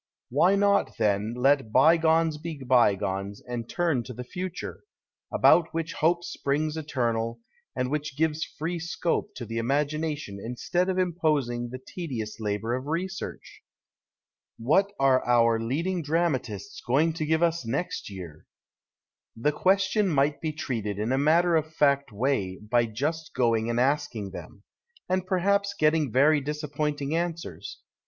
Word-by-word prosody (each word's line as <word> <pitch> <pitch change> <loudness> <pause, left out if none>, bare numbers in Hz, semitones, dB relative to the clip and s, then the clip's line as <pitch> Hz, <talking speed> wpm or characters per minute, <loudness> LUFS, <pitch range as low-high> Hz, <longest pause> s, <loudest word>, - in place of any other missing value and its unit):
Why 175 +9 +4
not, 200 0 +2
then, 105 +1 +1
let 135 -2 +2
bygones 160 +3 +4
be 165 -1 -6
bygones 100 -5 +1
and 120 -2 -5
turn 165 -8 +1
to 125 - -7
the 125 - -6
future, 180 +7 -6 0.5
about 165 -2 +4
which 165 0 -2
hope 170 +2 +1
springs 150 0 -1
eternal, 120 -6 -2 0.4
and 125 0 -1
which 150 -2 -3
gives 160 0 +1
free 170 +3 -4
scope 170 0 -2
to 120 - -6
the 115 +1 -3
imagination 145 -2 -1
instead 175 +10 -1
of 185 - -1
imposing 150 -9 0
the 130 - -6
tedious 130 -7 -6
labour 110 +2 -2
of 130 +2 -3
research? 185 +4 -5 1.0
What 155 - +2
are 135 -1 +4
our 115 -2 +3
leading 165 +11 -1
dramatists 150 - -2
going 150 +7 +2
to 155 -1 -3
give 160 +2 +2
us 170 -2 +1
next 130 +6 -3
year? 90 -6 -10 0.9
The 120 +7 +1
question 195 +4 +2
might 145 -1 +1
be 160 - -1
treated 115 -9 -3
in 110 +4 -1
a 130 - +2
matter 165 +4 +4
of 155 0 0
fact 140 -4 +2
way 105 -5 -1
by 115 +2 +1
just 150 +8 -3
going 115 -2 +2
and 120 0 0
asking 130 -7 0
them 100 +1 -10 0.2
— 475 0 -32
and 185 0 -1
perhaps 200 +2 +1
getting 155 -3 +2
very 145 +4 +4
disappoint 150 0 -3
ing 140 +3 -1
answers. 170 -1 -4
145 Hz, 145 wpm, -27 LUFS, 120-165 Hz, 1.0 s, Why